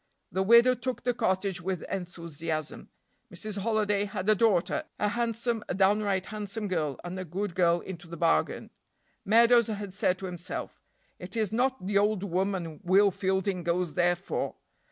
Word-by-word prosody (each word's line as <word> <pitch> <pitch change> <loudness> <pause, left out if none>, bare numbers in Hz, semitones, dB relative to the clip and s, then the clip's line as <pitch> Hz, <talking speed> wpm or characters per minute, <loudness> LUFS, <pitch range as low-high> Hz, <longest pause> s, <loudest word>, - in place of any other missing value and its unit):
The 190 - 0
widow 235 +5 +6
took 255 +1 -4
the 245 - +1
cottage 190 -5 0
with 185 0 -3
enthusiasm. 165 -4 -5 0.4
Mrs. 215 -2 -4
Holiday 210 -1 +1
had 195 -1 -5
a 215 - +6
daughter, 200 -5 +2
a 210 - +1
handsome 230 0 -1
a - - -1
downright 195 -1 +2
handsome 210 0 -5
girl, 155 -8 -2
and 180 +1 -5
a - - -3
good 185 +3 -4
girl 175 -1 +3
into 175 -2 -8
the 170 0 -8
bargain. 80 - +1 0.5
Meadows 235 +2 +5
had 205 -3 -5
said 185 -2 +1
to 190 - -7
himself: 175 -1 -6 0.4
"It 185 +5 -7
is 215 -4 0
not 255 -1 0
the 200 +1 +2
old 205 -1 +1
woman 185 -3 -2
Will 195 +3 +5
Fielding 190 0 -1
goes 170 -1 -1
there 175 0 +3
for. 185 +3 -4
195 Hz, 165 wpm, -28 LUFS, 180-215 Hz, 0.5 s, widow